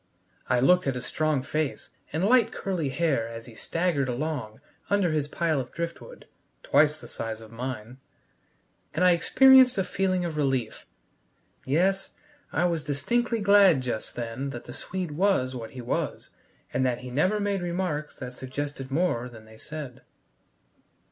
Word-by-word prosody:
I 125 - +3
looked 180 +6 +4
at 135 - 0
his 125 0 -3
strong 155 -2 0
face 155 0 -2 0.2
and 160 +5 0
light 235 0 +4
curly 175 -7 -2
hair 135 -5 0
as 115 0 -8
he 120 - -12
staggered 160 +1 -1
along 125 -4 -3 0.3
under 200 -4 +2
his 150 -2 0
pile 160 -1 0
of 125 -1 -5
driftwood 170 0 -6 0.4
(twice 150 +2 +3
the - - -11
size 110 -1 -5
of 110 -1 -13
mine!), 125 0 -6 1.0
and 180 +3 +3
I 180 - +7
experienced 260 +8 +6
a 190 - +2
feeling 185 -1 0
of 160 -3 -4
relief. 135 -6 -1 0.8
Yes, 190 +7 +1 0.4
I 165 +4 +1
was 170 -3 0
distinctly 230 - 0
glad 200 -7 +6
just 120 -3 -4
then 120 +3 -4
that 120 -3 -7
the 120 - -8
Swede 180 +3 -4
was 150 -6 +1
what 115 -3 -6
he 130 - -8
was, 120 - -3 0.4
and 130 - +1
that 125 -2 0
he 125 0 -8
never 185 +11 +2
made 200 -2 0
remarks 175 -4 -3
that 125 -1 -7
suggested 135 +1 -5
more 135 -5 0
than 110 -2 -13
they 110 0 -15
said. 150 -1 -8
150 Hz, 160 wpm, -27 LUFS, 125-180 Hz, 1.0 s, I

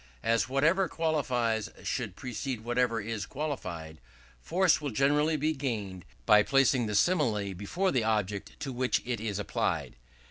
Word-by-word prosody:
As 115 +2 +2
whatever 165 +8 +3
qualifies 125 -9 0
should 110 -8 -3
precede 125 +1 -4
whatever 120 -1 +1
is 110 0 -4
qualified, 85 - -5 0.4
force 180 - +2
will 145 - -2
generally 145 +6 +2
be 155 +2 +1
gained 105 - -4 0.2
by 105 0 +7
placing 135 -1 +3
the 105 - -2
simile 110 - +2
before 170 - -1
the 125 -4 +1
object 105 -2 -2
to 135 - -4
which 125 +1 0
it 120 -2 -2
is 105 -3 -2
applied. 105 -10 -2
125 Hz, 145 wpm, -29 LUFS, 105-145 Hz, 0.4 s, by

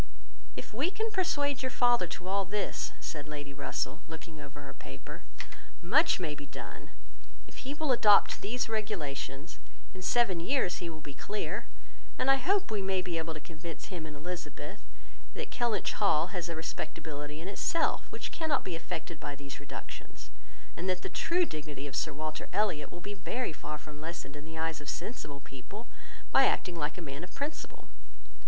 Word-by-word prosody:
"If - - -6
we 275 +10 +3
can 440 +3 0
persuade 290 -9 +2
your 260 - +1
father 240 -6 +5
to 180 +2 -5
all 195 +1 +3
this," 200 +2 0
said 150 -2 -4
Lady 145 -2 -5
Russell, 140 0 -1
looking 160 -1 -7
over 145 0 -8
her 140 -1 -7
paper, 70 -1 -8 0.6
"much 275 - +6
may 160 -5 0
be 145 -1 -7
done. - - -7 0.6
If - - -13
he 275 +2 -3
will 305 -2 +2
adopt 210 -4 +7
these 240 +5 +1
regulations, 160 -9 -2 0.3
in 185 - -7
seven 195 -2 +4
years 185 0 +3
he 175 - -2
will 160 -1 -6
be 145 - -5
clear; 200 +5 -2 0.5
and 270 - +6
I 270 - +7
hope 385 - +3
we 210 -2 +2
may 190 -1 +2
be 175 -3 0
able 160 0 -2
to - - -3
convince 165 +3 -7
him 165 -3 -3
and 150 - -7
Elizabeth, 175 +4 -5 0.5
that - - -3
Kellynch 240 -3 +2
Hall 180 -4 +4
has 175 -2 -1
a 170 - -1
respectability 150 -2 -3
in 165 - -5
itself 265 - +2
which - - -4
cannot 315 -3 +2
be 180 - -2
affected 165 -1 -4
by 145 -1 -3
these 140 0 -6
reductions; 145 - -8 0.4
and 185 +2 -1
that 185 0 +1
the - - -1
true 350 +1 +3
dignity 150 - -4
of 140 -1 -4
Sir 160 - +2
Walter 155 +1 -3
Elliot 190 -8 +2
will 175 - -7
be 205 - -2
very 205 +2 -1
far 150 0 -4
from 150 0 -9
lessened 160 -3 -4
in 145 +1 -7
the 160 0 -7
eyes 160 -1 0
of 145 - -4
sensible 155 - -3
people, 140 - -8 0.5
by - - +8
acting 180 -2 +1
like 155 0 -1
a 180 - -4
man 140 +1 -4
of 180 - -8
principle. 295 +2 -4
170 Hz, 185 wpm, -33 LUFS, 150-215 Hz, 0.6 s, by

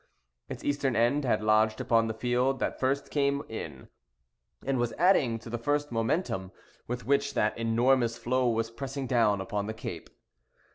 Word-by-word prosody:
Its - - -7
eastern 140 -3 0
end 120 +6 +2
had 110 -3 +1
lodged 110 0 +3
upon 115 -1 +2
the 110 - -2
field 125 +3 +1
that - - -2
first 135 +2 -1
came 140 -1 +1
in, 80 -11 -7 0.8
and 135 -2 0
was 120 -1 0
adding 150 -10 +3
to 115 - -13
the 120 +1 -4
first 145 +3 -1
momentum 115 - -1 0.4
with 125 +1 -4
which 140 +1 +1
that 105 - +1
enormous 115 +1 +2
floe 125 0 +1
was 115 0 -1
pressing 135 +2 -5
down 115 -5 +2
upon 100 +2 -3
the 110 - -4
cape. 85 -6 -7
120 Hz, 170 wpm, -29 LUFS, 110-135 Hz, 0.8 s, lodged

